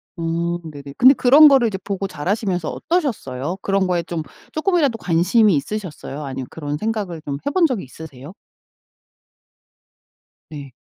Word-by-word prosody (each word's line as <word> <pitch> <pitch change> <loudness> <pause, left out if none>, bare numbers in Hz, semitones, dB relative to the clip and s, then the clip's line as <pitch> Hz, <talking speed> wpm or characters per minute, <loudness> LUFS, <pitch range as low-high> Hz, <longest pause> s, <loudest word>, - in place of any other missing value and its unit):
어 170 +1 -2
네네. 140 -3 -10
근데 255 +3 +7
그런 280 +5 +7
거를 265 -4 +5
이제 195 -3 -3
보고 195 -1 -3
자라시면서 185 0 -2
어떠셨어요? 190 - -2
그런 195 -1 +1
거에 175 -1 0
좀 165 -2 -4 0.3
조금이라도 310 -7 +1
관심이 180 +2 +3
있으셨어요? 150 -3 -5
아니면 130 -2 -6
그런 145 -2 -5
생각을 205 -5 -3
좀 140 -1 -3
해본 335 +4 +2
적이 245 -8 -3
있으세요? 140 +2 -11 2.2
네. 140 -4 -9
180 Hz, 325 characters per minute, -20 LUFS, 150-225 Hz, 2.2 s, 근데